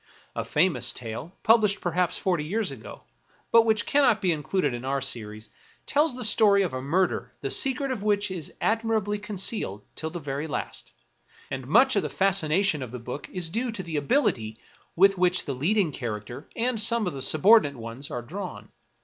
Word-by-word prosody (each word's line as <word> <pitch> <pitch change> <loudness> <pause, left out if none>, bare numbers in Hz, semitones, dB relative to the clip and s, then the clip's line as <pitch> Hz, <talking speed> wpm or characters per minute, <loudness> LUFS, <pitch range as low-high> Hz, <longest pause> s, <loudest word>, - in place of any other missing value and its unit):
A - - -2
famous 150 -7 +1
tale, 125 +10 -7
published 215 -3 +4
perhaps 175 0 0
forty 175 -5 0
years 200 +3 -2
ago, 125 -5 -10 0.5
but 230 0 +6
which 220 -1 +2
cannot 265 -7 +3
be 185 -3 +1
included 150 -1 -1
in 120 +1 -6
our 135 +1 -1
series, 110 -5 -4 0.3
tells 295 -1 +2
the 250 -2 -3
story 205 -2 +4
of 180 - -3
a 130 - -3
murder 175 +7 0
the - - -3
secret 270 0 +2
of 245 -6 -3
which 205 -1 0
is 170 -6 -5
admirably 220 -2 0
con 210 0 -7
cealed 180 - -1
till 160 - -4
the 150 -3 -5
last; - - -5 0.6
and 130 -1 -5
much 250 - +5
of 200 - +3
the - - -4
fascination 190 -3 +1
of 130 - -5
the 125 - -7
book 125 +4 -7
is 180 -2 -2
due 235 +4 -2
to 205 -4 -6
the 160 -3 -4
ability 130 - 0 0.4
with 195 +1 +4
which 180 0 +2
the 140 - -3
leading 170 +6 +1
character, 120 +2 -6
and 235 -1 0
some 230 0 +2
of 180 - -2
the 135 - -6
surbordinate 155 - +4
ones, 115 +4 -6
are 120 - -5
drawn. 180 +7 -7
180 Hz, 185 wpm, -26 LUFS, 135-215 Hz, 0.6 s, but